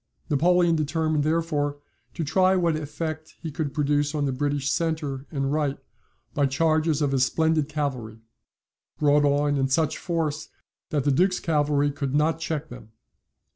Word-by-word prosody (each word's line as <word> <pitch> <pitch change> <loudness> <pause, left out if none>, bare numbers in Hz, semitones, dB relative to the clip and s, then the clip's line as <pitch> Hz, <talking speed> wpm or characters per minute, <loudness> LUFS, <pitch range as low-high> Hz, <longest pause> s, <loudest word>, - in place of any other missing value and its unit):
Napoleon 175 +3 +3
determined 155 0 0
therefore 155 -2 0 0.4
to 165 - -2
try 185 +5 +3
what 170 -3 +2
effect 155 +1 -5
he 160 - -6
could 145 -1 -3
produce 145 +1 0
on 145 -1 0
the 135 - 0
British 140 +1 -1
centre 150 -5 -2
and 135 -1 -2
right 145 -2 0 0.6
by 145 -2 +2
charges 155 +2 +1
of 140 - +1
his 135 -2 +2
splendid 160 +2 +1
cavalry, 130 -7 -3 0.8
brought 145 0 +3
on 145 0 +2
in 135 -1 +1
such 150 +3 0
force 160 -4 -2 0.4
that 145 -3 0
the 145 - +2
Duke's 185 +6 +2
cavalry 145 -3 +1
could 140 -1 -3
not 155 +2 +2
check 160 -1 -3
them. 115 -3 -12
150 Hz, 155 wpm, -25 LUFS, 140-160 Hz, 0.8 s, Napoleon